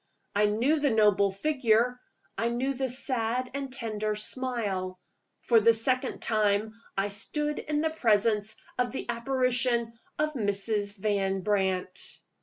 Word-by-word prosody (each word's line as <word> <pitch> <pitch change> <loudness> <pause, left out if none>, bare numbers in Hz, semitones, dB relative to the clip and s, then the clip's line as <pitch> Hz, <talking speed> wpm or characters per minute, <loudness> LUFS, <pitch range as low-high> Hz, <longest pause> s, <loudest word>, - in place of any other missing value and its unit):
I 210 +1 +4
knew 245 +9 +2
the 290 -1 +2
noble 210 -3 +4
figure; 245 0 +1 0.3
I 230 - 0
knew 255 +3 -1
the 265 0 -2
sad 250 -1 -1
and 275 -1 -4
tender 215 -4 -2
smile. 210 -6 -2 0.4
For 230 -2 +5
the 230 +1 +5
second 255 +3 0
time 215 0 +1 0.2
I 195 +1 +1
stood 295 +9 -1
in 300 0 -1
the 320 0 0
presence 215 -6 +2 0.2
of 250 0 0
the - - -4
apparition 240 -1 +1 0.2
of 305 0 0
Mrs. 205 -2 -1
Van 195 -1 0
Brandt. 190 -2 -1
230 Hz, 135 wpm, -28 LUFS, 205-255 Hz, 0.4 s, For